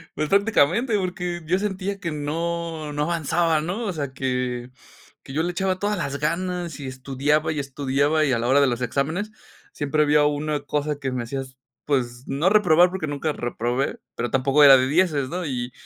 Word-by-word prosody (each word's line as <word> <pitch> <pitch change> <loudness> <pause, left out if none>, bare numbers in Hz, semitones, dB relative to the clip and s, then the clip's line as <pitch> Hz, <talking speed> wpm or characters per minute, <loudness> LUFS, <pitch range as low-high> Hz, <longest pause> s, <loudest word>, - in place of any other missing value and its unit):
pues 155 0 -2
prácticamente 210 - +3
porque 180 -2 -3
yo 185 +4 +1
sentía 200 -1 -3
que 170 -5 -3
no, 160 +1 -3
no 150 0 0
avanzaba, 165 0 +1
¿no?, 190 +8 -3
o 190 - -2
sea 140 -4 -4
que, 125 -2 -2 0.5
que 135 - -10
yo 160 +2 0
le 175 - -1
echaba 185 +1 -1
todas 205 0 -1
las 140 -4 -3
ganas 170 0 -2
y 135 - -6
estudiaba 140 +4 0
y 150 - -2
estudiaba 140 +3 +1
y 135 - +1
a 115 - +1
la 120 - -1
hora 135 +3 +5
de 140 - +4
los 125 0 -2
exámenes 155 - -1 0.4
siempre 150 +1 +1
había 150 0 +4
una 150 0 -1
cosa 145 0 -2
que 135 -2 -3
me 125 -1 -2
hacía 135 +3 -4
s 130 -1 -11 0.3
pues 125 -3 -1
no 150 +7 +1
reprobar 180 -4 +5
porque 185 -4 -4
nunca 145 +1 -2
reprobé, 120 +1 -2 0.2
pero 120 -1 -3
tampoco 135 +3 +3
era 135 -1 +10
de 130 0 +1
dieces, 150 -4 +1
¿no?, 180 +3 -3
y 125 -3 -3
150 Hz, 195 wpm, -23 LUFS, 135-175 Hz, 0.5 s, era